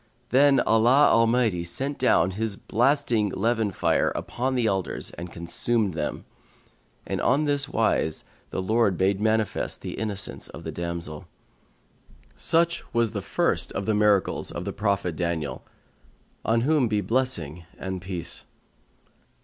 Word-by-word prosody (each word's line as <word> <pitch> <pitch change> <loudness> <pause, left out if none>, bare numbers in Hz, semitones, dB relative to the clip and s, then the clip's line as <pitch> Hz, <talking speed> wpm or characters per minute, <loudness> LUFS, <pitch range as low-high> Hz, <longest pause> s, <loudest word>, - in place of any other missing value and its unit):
Then 140 +1 +5
Allah 120 +6 +5
Almighty 115 -5 +3
sent 135 +12 -3
down 85 +3 +3
His 105 +1 -2
blasting 120 -3 +1
leven 110 +2 0
fire 95 - +1
upon 130 +2 -2
the 125 -2 +1
elders 95 -3 -1
and 85 0 -8
consumed 100 +4 -1
them, 75 -2 -4 0.8
and - - -3
on 140 +4 +2
this 145 -1 +1
wise 110 - +1 0.3
the 95 - -3
Lord 110 -2 +2
made 95 +1 +2
manifest 110 -1 0
the - - -6
innocence 105 -3 -3
of - - -11
the - - -5
damsel. 85 -3 -5 1.1
Such 170 +1 +1
was 115 -2 +2
the - - -3
first - - 0
of 100 - -3
the 110 - +1
miracles 105 -2 +2
of - - -6
the - - -3
Prophet 100 -5 -1
Daniel, 80 -6 -3 0.8
on 115 +1 +2
whom 145 -1 +2
be 105 -2 0
blessing 100 - -1
and 95 -1 -5
peace! 90 -2 -6
110 Hz, 140 wpm, -25 LUFS, 90-120 Hz, 1.1 s, Then